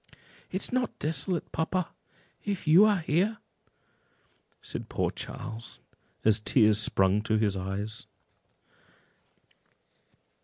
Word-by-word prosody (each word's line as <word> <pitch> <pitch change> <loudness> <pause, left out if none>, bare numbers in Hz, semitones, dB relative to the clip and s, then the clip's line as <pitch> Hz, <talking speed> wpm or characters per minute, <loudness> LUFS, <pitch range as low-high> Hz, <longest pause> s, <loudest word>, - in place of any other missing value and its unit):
"It 190 - -2
is - - -3
not 250 -2 -1
desolate, 160 +4 -2
papa, 170 +2 -1 0.5
if 200 -4 -3
you 170 +7 +8
are 205 -4 +3
here," 185 +8 +1 1.3
said - - -6
poor - - 0
Charles, 115 0 -7 0.5
as 110 -1 +5
tears 105 -1 +4
sprung 95 -1 +2
to 110 0 +1
his 105 -2 +1
eyes. 100 +3 -4
130 Hz, 105 wpm, -29 LUFS, -, 1.3 s, you